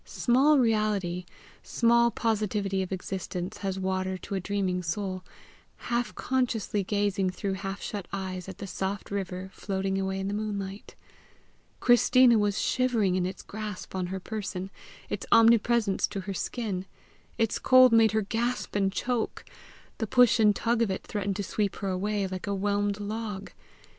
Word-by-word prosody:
Small 270 +5 +3
reality, 210 -7 +1 0.4
small 235 0 +3
positivity 210 -4 -1
of 185 - -4
existence 185 -1 -4
has 195 -1 -3
water 190 0 -1
to 190 - -8
a 195 - 0
dreaming 185 -1 -1
soul, 185 +2 -3 0.5
half 240 0 -2
consciously 235 -6 0
gazing 200 -1 0
through 195 +1 -3
half 195 +1 -5
shut 200 -4 -5
eyes 190 -1 -4
at 190 - -8
the - - -6
soft 195 +1 -4
river 190 -1 -4
floating 195 -1 -2
away 190 0 -2
in 195 - -2
the 200 - -2
moonlight: 205 -2 -4 0.8
Christina 245 -1 +5
was 205 -1 +1
shivering 235 -7 +1
in 180 -1 +1
its 185 - -7
grasp 210 -2 -7
on 185 -1 -2
her 190 +1 -4
person, 195 -2 -5 0.4
its - - -4
omnipresence 230 -2 +4
to 195 - -5
her 195 +1 -5
skin; 190 -2 -3 0.5
its 225 -2 +1
cold 255 -2 +6
made 225 -1 +5
her 220 -1 +2
gasp 235 +4 -2
and 195 -1 +2
choke; 245 +2 -2 0.5
the 220 - -1
push 245 0 +5
and 210 -2 +5
tug 235 +2 0
of 230 - +2
it 190 - -3
threatened 200 -2 -3
to 200 - -2
sweep 200 +1 -1
her 195 - -3
away 200 +2 -1
like 185 +1 -5
a 200 - 0
whelmed 205 +1 0
log! 210 -1 -5
200 Hz, 160 wpm, -28 LUFS, 190-225 Hz, 0.8 s, cold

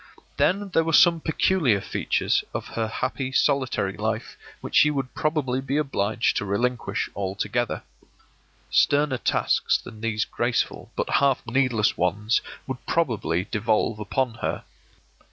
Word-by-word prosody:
Then 200 +2 +1
there 165 -2 +2
were 165 0 -2
some 170 +1 +6
peculiar 155 - +2
features - - 0
of - - -4
her 115 -1 -2
happy 130 +3 -3
solitary 130 -8 +1
life 110 +1 -3 0.2
which - - -8
she 150 - +6
would 135 -3 -3
probably 150 -6 -1
be 135 +2 -2
obliged 115 -7 0
to - - -1
relinquish 120 +5 -1
altogether. 105 +5 -2 0.9
Sterner 145 -3 +3
tasks - - +1
than 110 -1 -12
these 110 -1 0
graceful 120 0 -2
but - - -1
half 140 -2 +2
needless 120 -3 +1
ones 105 +6 +1 0.2
would 130 -1 -6
probably 105 - 0
devolve 110 0 +1
upon 115 +4 -1
her. - - -2
120 Hz, 135 wpm, -25 LUFS, 105-140 Hz, 0.9 s, some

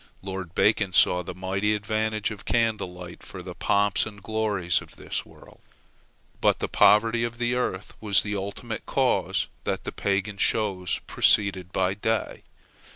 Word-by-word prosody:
Lord 95 -3 -6
Bacon 100 -3 +2
saw 90 0 +5
the 90 0 -7
mighty 95 +3 0
advantage 110 +1 -1
of 105 - -8
candle 115 -5 0
light 90 -1 -10
for 95 -2 -9
the 90 -1 -7
pomps 100 +3 +1
and 105 -2 -10
glories 105 -6 +1
of - - -14
this - - -4
world. - - -17 0.8
But - - +4
the - - -2
poverty 115 +2 +4
of 115 0 -3
the 120 +1 0
earth 105 -6 -2
was 105 -3 +3
the 105 0 -3
ultimate 100 +3 -5
cause - - +1 0.2
that - - -2
the - - -4
Pagan 100 +1 -1
shows 95 -5 +1
proceeded 95 -3 +2
by 95 0 +1
day. 110 +2 -2
100 Hz, 155 wpm, -26 LUFS, 95-110 Hz, 0.8 s, saw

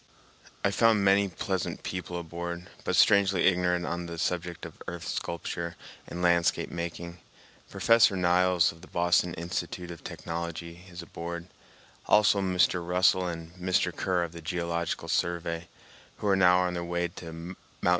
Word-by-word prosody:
I - - +3
found 110 -3 +4
many 100 +1 +5
pleasant 95 0 -3
people 90 -1 -4
aboard, 85 +1 -6 0.2
but - - 0
strangely 95 -2 +5
ignorant 90 -1 +2
on 85 0 -3
the 85 -1 -6
subject 85 0 -2
of - - -11
earth 85 -3 -6
sculpture 85 0 -4 0.3
and 90 +1 -5
landscape 85 -1 +2
making. 85 0 -5 0.5
Professor 115 -3 +4
Niles, 90 -1 +3
of 80 - -16
the 95 - -13
Boston 85 0 +2
Institute 85 +1 -4
of 85 - -10
Technology, 85 +1 -6
is 85 -1 -8
aboard; 85 0 -6 0.6
also 105 -1 +5
Mr. 90 -2 +2
Russell 90 +1 +3
and 85 -1 -6
Mr. 90 -1 +1
Kerr 90 -2 0
of 85 - -4
the 85 0 -9
Geological 85 0 -2
Survey, 85 -1 -1 0.5
who 105 - -3
are 100 - +4
now 90 -1 +5
on 90 -1 0
their 85 -1 -3
way 85 0 -1
to 85 -1 -9
Mt. 85 +3 -8
85 Hz, 155 wpm, -28 LUFS, 85-90 Hz, 0.6 s, many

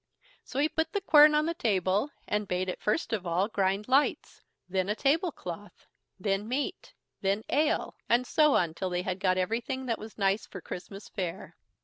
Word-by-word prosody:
So - - -8
he 290 +2 +3
put 320 +1 -2
the 405 - +1
quern 300 -5 +7
on 300 0 +3
the 335 - 0
table, 205 - +1 0.2
and 210 0 -1
bade 185 +1 -1
it 185 - -5
first 215 +4 0
of 190 -5 -2
all 175 +4 +1
grind 195 -1 0
lights, 270 +3 +1 0.3
then 185 +1 -1
a 210 - +1
table 320 +8 +2
cloth, 185 - -9 0.3
then 195 +2 -1
meat, 265 +5 -3 0.3
then 200 +2 0
ale, 305 +1 +1 0.2
and 240 +2 +3
so 300 +2 +4
on 170 -3 +2
till 185 +2 -3
they 180 0 -1
had 185 0 -3
got 185 -1 +2
everything 235 +7 -2
that 230 -2 -1
was 220 0 -10
nice 195 0 +1
for 190 - -8
Christmas 195 +4 -8
fare. 180 -1 -5
210 Hz, 195 wpm, -29 LUFS, 185-270 Hz, 0.3 s, quern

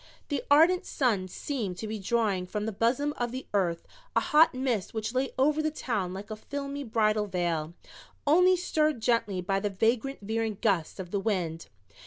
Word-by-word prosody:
The 285 - -1
ardent 335 +6 +5
sun 220 - 0
seemed 205 -3 -4
to 220 - -5
be 215 0 -4
drawing 200 -3 0
from 210 +2 -3
the 220 - -2
bosom 250 +8 +1
of 240 -1 -2
the 260 +1 -6
earth 175 -4 0 0.3
a - - +6
hot 305 -2 +4
mist 245 -7 -1
which 220 +1 -2
lay 260 +1 0
over 300 +4 +3
the 310 - +1
town 220 -11 -2
like 200 +4 -7
a - - -3
filmy 280 +5 -5
bridal 215 -3 +1
veil, 170 -3 -2 0.5
only 360 +5 +5
stirred 310 -6 +1
gently 220 -5 +1
by 195 +2 0
the 205 +1 -1
vagrant 225 +7 0
veering 220 0 -2
gusts 195 -6 0
of 180 0 -7
wind. 185 -6 -1
220 Hz, 180 wpm, -28 LUFS, 195-275 Hz, 0.5 s, a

